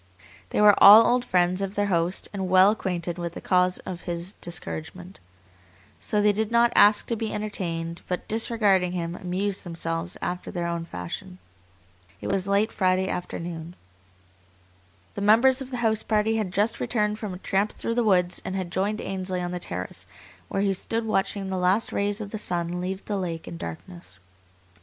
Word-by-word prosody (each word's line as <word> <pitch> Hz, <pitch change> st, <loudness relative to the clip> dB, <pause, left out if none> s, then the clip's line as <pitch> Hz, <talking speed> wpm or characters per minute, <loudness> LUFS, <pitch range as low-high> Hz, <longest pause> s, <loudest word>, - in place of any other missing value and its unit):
They -, -, -1 dB
were 210 Hz, 0 st, +8 dB
all 215 Hz, +3 st, +11 dB
old 245 Hz, 0 st, +2 dB
friends 180 Hz, -2 st, +1 dB
of 195 Hz, +1 st, -3 dB
their 205 Hz, -, +1 dB
host 175 Hz, -1 st, 0 dB
and 190 Hz, -2 st, -3 dB
well 185 Hz, +2 st, +6 dB
acquainted 175 Hz, -4 st, -3 dB
with 170 Hz, -1 st, -4 dB
the -, -, -7 dB
cause 180 Hz, -1 st, +2 dB
of 180 Hz, -1 st, -6 dB
his 170 Hz, +2 st, -2 dB
discouragement. 175 Hz, +2 st, -5 dB, 0.8 s
So 210 Hz, -1 st, 0 dB
they 210 Hz, -, +5 dB
did 215 Hz, +1 st, -1 dB
not 235 Hz, 0 st, +4 dB
ask 205 Hz, +1 st, +6 dB
to 230 Hz, -, -2 dB
be 220 Hz, 0 st, -3 dB
entertained, 170 Hz, -5 st, -4 dB
but, 180 Hz, -, -4 dB
disregarding 210 Hz, -5 st, +2 dB
him, 170 Hz, -1 st, -3 dB
amused 185 Hz, +2 st, -3 dB
themselves 165 Hz, 0 st, -3 dB
after 180 Hz, 0 st, -4 dB
their 175 Hz, -1 st, -3 dB
own 170 Hz, -1 st, -3 dB
fashion. 170 Hz, -, -7 dB, 0.8 s
It -, -, -5 dB
was 195 Hz, -1 st, -1 dB
late 200 Hz, +2 st, +2 dB
Friday 185 Hz, -1 st, +1 dB
afternoon. 170 Hz, -1 st, -5 dB, 1.4 s
The 200 Hz, -, -5 dB
members 240 Hz, +6 st, +5 dB
of 265 Hz, -, -7 dB
the 250 Hz, -, -4 dB
house 220 Hz, -1 st, +2 dB
party 220 Hz, +1 st, +1 dB
had 210 Hz, -4 st, -2 dB
just 205 Hz, +4 st, 0 dB
returned 210 Hz, -2 st, -1 dB
from 205 Hz, -4 st, -5 dB
a -, -, -7 dB
tramp 195 Hz, +3 st, -1 dB
through 230 Hz, -, -3 dB
the 240 Hz, 0 st, +1 dB
woods 180 Hz, -4 st, +2 dB
and 190 Hz, -, -4 dB
had 185 Hz, -2 st, -4 dB
joined 200 Hz, +4 st, -1 dB
Ainsley 185 Hz, -1 st, -3 dB
on 175 Hz, 0 st, -3 dB
the 180 Hz, -, -4 dB
terrace, -, -, -6 dB, 0.4 s
where 195 Hz, 0 st, -1 dB
he 200 Hz, -1 st, +2 dB
stood 225 Hz, +4 st, -3 dB
watching 195 Hz, -2 st, -1 dB
the 190 Hz, -, -1 dB
last 185 Hz, +5 st, +1 dB
rays 205 Hz, +1 st, 0 dB
of 205 Hz, -2 st, -6 dB
the 215 Hz, -, -4 dB
sun 175 Hz, -2 st, -2 dB
leave 190 Hz, +2 st, -4 dB
the 205 Hz, -, -2 dB
lake 170 Hz, -4 st, -4 dB
in -, -, -7 dB
darkness. 165 Hz, -, -9 dB
190 Hz, 185 wpm, -25 LUFS, 175-210 Hz, 1.4 s, all